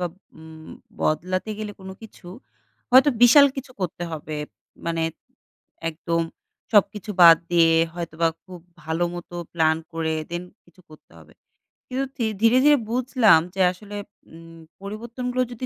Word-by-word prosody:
বা 180 - 0 0.3
উম 160 0 -13 0.3
বদলাতে 185 +6 -1
গেলে 215 -1 -5
কোন 190 0 -9
কিছু, 215 -4 -14 0.6
হয়তো 260 +4 +7
বিশাল 280 +4 +8
কিছু 270 0 -7
করতে 175 -1 -4
হবে। 155 0 -6 0.5
মানে, 165 -1 -1 0.9
একদম 165 +1 -2 0.5
সবকিছু 210 0 +2
বাদ 165 -1 +10
দিয়ে 170 -1 +4 0.2
হয়তোবা 165 -1 -1 0.2
খুব 185 -2 -11 0.2
ভালো 160 +2 -1
মতো 175 0 -9 0.2
প্ল্যান 160 -1 +2 0.2
করে 160 -1 -2 0.2
then 175 +1 -4 0.2
কিছু 175 +1 -23
করতে 155 - -18
হবে। 80 -1 -18 0.6
কিন্তু 260 +2 -2
থি 235 - -1 0.2
ধীরে, 230 +2 +5
ধীরে 295 0 +6
বুঝলাম 245 - +4 0.2
যে, 190 - 0
আসলে 205 +3 -11 0.4
উম 165 0 -14 0.2
পরিবর্তনগুলো 235 +5 -4
যদি 245 +1 -6
180 Hz, 140 wpm, -23 LUFS, 165-230 Hz, 0.9 s, বাদ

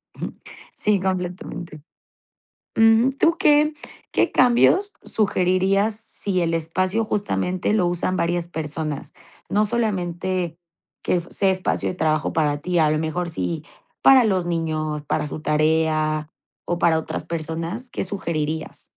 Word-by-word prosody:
Ujú, - - -5 0.4
sí, 210 -1 +1
completamente. 180 -4 -4 1.0
Ujú, 225 +3 +5
¿tú 330 0 +3
qué 300 0 +4 0.4
qué - - +2
cambios 255 +11 +4
sugerirías 195 +1 +1
si 205 -3 -2
el 165 -1 0
espacio 185 +7 0
justamente 200 -3 -1
lo 195 -5 +2
usan 175 +1 0
varias 175 -1 -1
personas?, 155 -2 -4 0.4
no 210 +1 +2
solamente, 185 -6 -1 0.5
que 180 - +1
sea 190 +3 +1
espacio 185 -1 0
de - - -5
trabajo 155 -3 0
para 150 -2 +1
ti, 180 -1 0
a 155 -2 +4
lo 155 - +1
mejor 160 +3 -2
sí, 90 - -3 0.4
para 265 -2 +7
los 190 -5 +1
niños, 155 -3 -2
para 150 - -1
su 150 - -6
tarea, 155 0 +1 0.3
o 175 - -2
para 165 -2 +3
otras 160 - -4
personas, 165 - -4
¿qué - - -3
sugerirías? 160 -5 -3
175 Hz, 135 wpm, -22 LUFS, 160-200 Hz, 1.0 s, para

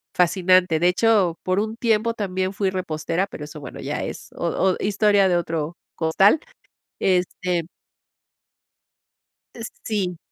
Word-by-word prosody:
fascinante. 180 -1 +3
De 175 - +3
hecho, 185 -3 +3
por 185 +1 +1
un 220 +2 -3
tiempo 230 -1 +1
también 190 -2 -2
fui 195 -1 0
repostera, 170 0 -2
pero 150 - -9
eso, 150 +1 -10
bueno, 135 -3 -9
ya - - -3
es - - -7
o - - -2
o 190 -1 +1
historia 205 -1 +3
de 175 - +3
otro 165 -1 -3 0.2
costal 190 - +4 0.6
este 180 -1 0 1.9
Eh, 235 - -9 0.2
sí. 190 -5 -2
185 Hz, 135 wpm, -23 LUFS, 170-205 Hz, 1.9 s, costal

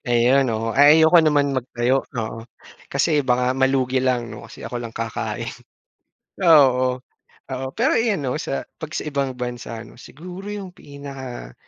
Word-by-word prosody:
Ayun 125 +3 +3
oo, 115 0 -2
ay 145 +3 +7
ayoko 165 +2 +7
naman 145 -2 +2
mag-tayo 130 +1 0
oo 115 0 -4 0.5
kasi 145 +2 +2
baka 125 -1 +1
malugi 130 -1 +1
lang 120 -3 0
'no 105 - -10
kasi - - -11
ako 120 - -4
lang 115 - -6
kakain. 115 -1 -3 1.0
Oo, 130 -6 +5 0.5
oo 130 0 -3
pero 245 +4 +2
ayan 215 -9 +1
'no 125 - -1
sa 70 0 -3 0.2
pag, - - -6
sa - - -4
ibang 140 -3 -2
bansa 120 -2 -5
ano - - -16
siguro 180 +10 -10
yung 195 -3 -7
pinaka 135 - -9
130 Hz, 155 wpm, -22 LUFS, 120-145 Hz, 1.0 s, ay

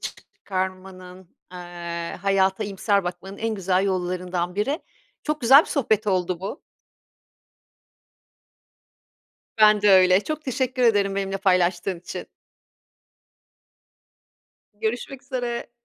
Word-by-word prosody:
çıkarmanın, 185 -1 -6 0.2
eee, 175 -1 -6
hayata 195 +1 +2
iyimser 200 0 0
bakmanın 180 +3 -6
en 225 0 -2
güzel 190 -1 +1
yollarından 180 -1 -2
biri. 275 - -1 0.4
Çok 300 0 -2
güzel 265 +4 +8
bir - - -6
sohbet 220 -7 0
oldu 185 -3 0
bu. 195 +9 -6 3.0
Ben 215 -1 +6
de 210 - +5
öyle, 185 0 +6
çok 310 0 -4
teşekkür 260 -1 -1
ederim 205 -4 +3
benimle 195 0 -2
paylaştığın 180 -1 +1
için. 180 - -7 2.5
Görüşmek 240 +5 -4
üzere. 245 -3 -4
195 Hz, 100 wpm, -24 LUFS, 185-225 Hz, 3.0 s, güzel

